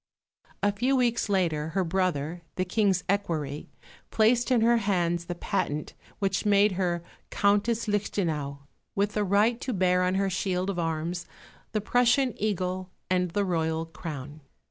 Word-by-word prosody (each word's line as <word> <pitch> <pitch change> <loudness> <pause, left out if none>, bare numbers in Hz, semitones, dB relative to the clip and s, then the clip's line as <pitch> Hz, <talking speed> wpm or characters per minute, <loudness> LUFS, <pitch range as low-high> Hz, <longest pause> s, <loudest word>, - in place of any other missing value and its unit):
A 205 - +4
few 245 +7 +1
weeks 240 -4 +1
later 165 -6 +1
her 190 - +3
brother, 175 -2 -1
the 185 - 0
King's 195 -1 +1
equerry, 160 -8 -2 0.4
placed 235 +3 +3
in 250 -3 +3
her 235 +1 +5
hands 175 -5 0
the 175 - -4
patent 170 -5 -2 0.2
which 195 -2 0
made 205 0 +4
her 175 -2 -1 0.3
Countess 210 +3 +1
Lichtenau, 160 -9 -1 0.3
with 205 +1 +1
the 210 - +1
right 210 +5 +2
to 255 - -2
bear 180 -2 +2
on 180 +1 +1
her 195 0 +1
shield 190 0 -1
of 180 - -4
arms 165 +1 -2 0.4
the 215 - 0
Prussian 245 +3 +3
eagle 185 -3 -1 0.2
and 180 -1 +2
the 200 +4 0
Royal 160 -2 0
crown. 155 -3 -8
190 Hz, 150 wpm, -27 LUFS, 170-210 Hz, 0.4 s, her